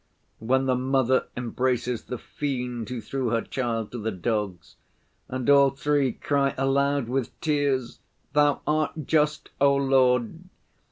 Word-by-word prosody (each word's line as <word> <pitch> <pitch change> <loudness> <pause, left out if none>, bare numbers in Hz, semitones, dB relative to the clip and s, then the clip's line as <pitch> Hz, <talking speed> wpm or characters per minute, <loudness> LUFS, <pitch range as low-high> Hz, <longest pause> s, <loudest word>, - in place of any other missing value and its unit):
When 130 +4 +1
the 130 - +2
mother 130 0 +1
embraces 125 0 -1
the 125 - -5
fiend 125 -4 -4
who 125 -2 -4
threw 130 +2 -3
her 115 0 0
child 115 -4 -3
to 120 - -5
the 110 +1 -2
dogs, 100 -3 -3 0.5
and 130 -1 -4
all 140 -1 +6
three 140 -1 0
cry 140 -2 0
aloud 140 0 +1
with 130 0 -3
tears, 145 -5 0 0.3
'Thou 145 0 +3
art 155 0 -1
just, 150 0 +1
O 140 0 +5
Lord! 130 0 +2
130 Hz, 135 wpm, -25 LUFS, 120-140 Hz, 0.5 s, all